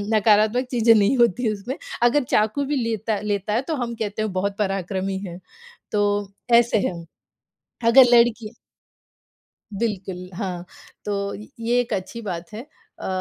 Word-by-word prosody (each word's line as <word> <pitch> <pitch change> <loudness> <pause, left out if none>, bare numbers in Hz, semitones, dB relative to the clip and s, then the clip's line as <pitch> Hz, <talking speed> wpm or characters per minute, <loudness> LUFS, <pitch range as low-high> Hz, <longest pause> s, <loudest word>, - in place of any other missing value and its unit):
नकारात्मक 215 +4 +3
चीज़ें 230 -2 +5
नहीं 215 +5 +3
होती 235 -1 +2
उसमें। 240 - -6 0.3
अगर 255 +4 +4
चाकू 220 +5 +1
भी 290 +1 -1
लेता 220 -2 -2
लेता 210 0 -2
है, 235 - +2
तो 310 +3 -3
हम 240 -3 -3
कहते 215 -1 -3
हैं 215 -2 -1
बहुत 195 +2 -2
पराक्रमी 195 -1 -2
है। 175 +1 -8 0.5
तो 210 - 0 0.6
ऐसे 235 -1 +4
हैं। 170 -2 -6 0.8
अगर 255 +3 +8
लड़की 235 -1 +3 1.2
बिल्कुल, 190 -5 -3
हाँ। 180 -3 -4 0.4
तो 200 -1 -2 0.3
ये 240 +2 +2
एक 240 -2 -4
अच्छी 200 +5 -5
बात 175 -3 -6
है। 220 +3 -6 0.4
अ - - -7
215 Hz, 145 wpm, -23 LUFS, 195-235 Hz, 1.2 s, अगर